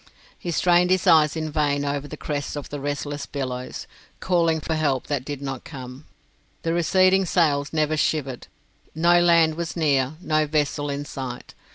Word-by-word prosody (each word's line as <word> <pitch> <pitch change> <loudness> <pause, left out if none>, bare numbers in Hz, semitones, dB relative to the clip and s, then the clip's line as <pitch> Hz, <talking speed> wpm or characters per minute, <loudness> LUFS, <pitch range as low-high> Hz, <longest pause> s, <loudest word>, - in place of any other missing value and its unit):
He 175 - -7
strained 175 +1 +3
his 185 -1 +2
eyes 155 -1 +5
in 155 -1 -3
vain 145 -2 0
over 145 0 -2
the 155 - -8
crests 145 0 -4
of 145 - -6
the 145 - -5
restless 145 0 -4
billows, 130 -3 -5 0.3
calling 165 -3 +1
for 155 - -11
the 160 - +1
help 140 -5 0
that 140 -3 -2
did 145 0 -6
not 135 -2 -5
come. 130 0 -9 0.6
The 165 - 0
receding 185 +3 +3
sails 145 -5 +1
never 155 -1 +1
shivered; 140 -4 -1 0.5
no 170 +2 +4
land 170 -2 +4
was 170 +1 -5
near, 140 -3 +1
no 155 -3 +1
vessel 145 -1 -1
in 140 +1 -3
sight. 130 -3 -7
150 Hz, 175 wpm, -24 LUFS, 140-165 Hz, 0.6 s, eyes